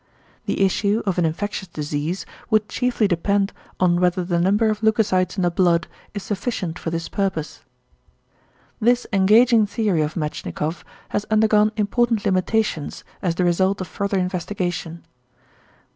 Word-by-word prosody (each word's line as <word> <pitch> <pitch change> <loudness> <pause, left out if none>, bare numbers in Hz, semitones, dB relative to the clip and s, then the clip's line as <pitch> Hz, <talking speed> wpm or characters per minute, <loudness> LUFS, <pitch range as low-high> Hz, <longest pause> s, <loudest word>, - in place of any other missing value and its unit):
The 195 - +2
issue 200 +3 +1
of 190 -3 0
an 170 - +3
infectious 190 +4 -3
disease 155 +3 -3 0.2
would 215 -2 +2
chiefly 245 -3 0
depend 200 +3 +1 0.3
on 175 -1 +3
whether 180 0 +2
the 175 -1 0
number 205 +5 +3
of 210 0 -4
leucocytes 210 -4 +2
in 185 - +1
the 175 - +2
blood 170 -2 +2 0.3
is 200 - -4
sufficient 195 -5 -3
for - - -3
this 165 0 -3
purpose. 190 -6 -3 1.2
This 245 +2 +2
engaging 215 +3 +5
theory 205 -6 0
of 150 +1 -2
Metschnikoff 155 0 -3 0.3
has 205 - -2
undergone 215 -1 +3
important 225 +1 +1
limitations 185 -3 0 0.2
as 175 -4 0
the 180 - +1
result 190 +3 +2
of 185 - -4
further 200 -1 -2
investigation. 180 -2 -3
190 Hz, 145 wpm, -22 LUFS, 175-210 Hz, 1.2 s, engaging